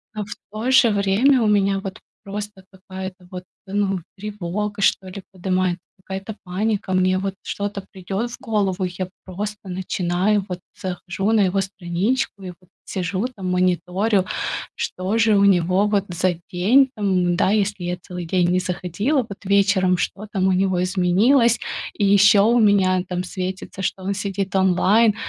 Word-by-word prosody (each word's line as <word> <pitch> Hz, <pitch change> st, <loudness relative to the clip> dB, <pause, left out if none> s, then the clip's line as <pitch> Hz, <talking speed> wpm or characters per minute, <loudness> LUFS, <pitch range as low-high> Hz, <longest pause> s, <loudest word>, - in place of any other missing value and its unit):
но 210 Hz, -, -2 dB
в 205 Hz, -, -7 dB, 0.2 s
то 220 Hz, +5 st, -2 dB
же 250 Hz, -3 st, +6 dB
время 205 Hz, +7 st, +3 dB
у -, -, +2 dB
меня 200 Hz, -1 st, +2 dB
вот 195 Hz, 0 st, -7 dB, 0.2 s
просто 205 Hz, -1 st, -7 dB
какая-то 190 Hz, -1 st, -9 dB
вот, 180 Hz, -1 st, -6 dB, 0.2 s
ну 195 Hz, -1 st, 0 dB, 0.2 s
тревога, 205 Hz, 0 st, -4 dB
что 190 Hz, -, +2 dB
ли, 190 Hz, +1 st, -8 dB
подымается, 185 Hz, -1 st, -1 dB, 0.3 s
какая-то 195 Hz, +2 st, -6 dB
паника. 200 Hz, +1 st, -2 dB
Мне 185 Hz, 0 st, +3 dB
вот 195 Hz, 0 st, -2 dB
что-то 205 Hz, -1 st, -4 dB
придет 195 Hz, +5 st, -4 dB
в -, -, -8 dB
голову, 205 Hz, -6 st, -1 dB
и 180 Hz, -, -5 dB
я 185 Hz, -1 st, -3 dB, 0.2 s
просто 205 Hz, +2 st, -6 dB
начинаю, 185 Hz, +2 st, 0 dB
вот 180 Hz, -1 st, -5 dB, 0.2 s
захожу 185 Hz, +2 st, -2 dB
на 225 Hz, -, +4 dB
его 195 Hz, 0 st, +2 dB
страничку, 195 Hz, +4 st, -2 dB
и 185 Hz, -, -6 dB
вот 180 Hz, 0 st, -15 dB, 0.2 s
сижу 190 Hz, +2 st, -2 dB
там 190 Hz, -3 st, -4 dB
мониторю, 185 Hz, +3 st, +1 dB, 0.5 s
что 185 Hz, +4 st, -2 dB
же 225 Hz, -2 st, +4 dB
у 200 Hz, -, +5 dB
него, 185 Hz, +1 st, +3 dB
вот, 205 Hz, -2 st, +1 dB
за 180 Hz, +1 st, 0 dB, 0.2 s
день 230 Hz, +10 st, +4 dB
там, 190 Hz, -4 st, +1 dB
м. 175 Hz, -, +2 dB
Да, 180 Hz, -, +2 dB
если 205 Hz, -3 st, 0 dB
я 180 Hz, 0 st, -2 dB
целый 180 Hz, -1 st, -7 dB
день 175 Hz, +1 st, +1 dB
не 180 Hz, -, +2 dB
заходила, 185 Hz, -, -1 dB
вот, 200 Hz, -2 st, -10 dB
вечером- 195 Hz, -2 st, +3 dB
что 205 Hz, +4 st, -3 dB
там 190 Hz, -2 st, +1 dB
у -, -, +3 dB
него 185 Hz, -1 st, +1 dB
изменилось? 205 Hz, +7 st, +3 dB, 0.4 s
И 205 Hz, -, +1 dB
еще 200 Hz, 0 st, +6 dB
у 235 Hz, +4 st, +4 dB
меня 195 Hz, -4 st, +4 dB
там 180 Hz, 0 st, -2 dB
светится, 185 Hz, +1 st, -5 dB
что 190 Hz, 0 st, -3 dB
он 195 Hz, +1 st, -1 dB
сидит 195 Hz, -1 st, -3 dB
онлайн. 195 Hz, +4 st, +4 dB
195 Hz, 170 wpm, -22 LUFS, 185-205 Hz, 0.5 s, же